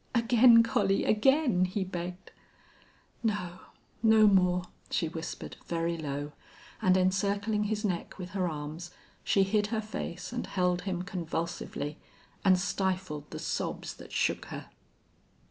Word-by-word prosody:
"Again, 235 0 +7
Collie 195 -3 +1
again!" 245 - +3
he 190 +2 -2
begged. 180 0 -6 0.9
"No 185 -5 -2 0.4
no 220 -1 +6
more," 180 -3 +4 0.3
she 165 - 0
whispered, 160 0 -6
very 170 0 -1
low, 145 -2 -4 0.5
and 185 0 +4
encircling 200 +3 +1
his 210 0 -1
neck 180 -4 -3
with 180 -2 -7
her 185 -3 0
arms 155 +3 -6 0.3
she 195 - +3
hid 205 +2 +1
her 220 +1 -1
face 215 -2 -5
and 245 - -3
held 180 -1 +1
him 180 -1 -2
convulsively, 165 -4 -4 0.4
and 190 -2 +6
stifled 185 -6 -2
the - - -6
sobs - - -3
that - - -13
shook - - 0
her. - - -8
185 Hz, 130 wpm, -30 LUFS, 175-210 Hz, 0.9 s, Again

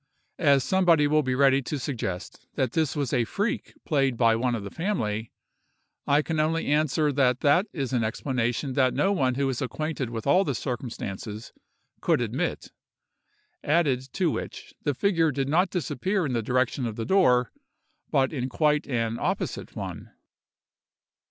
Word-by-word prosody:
As 140 -5 +4
somebody 175 -4 +3
will 155 +1 +3
be 130 -3 -1
ready 135 0 +4
to 145 +3 -4
suggest 115 -9 -5
that 130 -4 0
this 160 0 0
was 140 -4 -2
a 120 - +3
freak 205 - -3
played 135 -5 +1
by 115 -1 +4
one 120 +1 0
of 110 - -5
the 100 - -7
family, 110 - -2 0.8
I 145 +2 +4
can 160 0 -2
only 160 +2 +1
answer 150 0 +2
that 130 -2 +2
that 165 +8 +4
is 135 -4 -3
an 120 -3 +2
explanation 125 +3 -1
that 130 -1 +2
no 195 - +2
one 130 -10 +1
who 140 +1 0
is 130 -2 -2
acquainted 145 -1 -3
with 115 -2 -5
all 180 +7 +4
the 140 -8 -2
circumstances, 110 -4 -5 0.5
could - - +2
admit; - - -2 0.9
added 140 -5 +1
to 180 -5 +1
which, - - -6
the 145 -3 -1
figure 165 -2 +2
did 135 0 -2
not 175 +6 +2
disappear 185 +1 -1
in 135 - -2
the 115 - 0
direction 125 +2 0
of 110 - -5
the 115 - -4
door, 125 -11 +3 0.6
but 135 -1 +2
in 130 -2 -2
quite 150 +1 +1
an 115 -3 -1
opposite - - -3
one. - - -6
135 Hz, 165 wpm, -26 LUFS, 125-155 Hz, 0.9 s, As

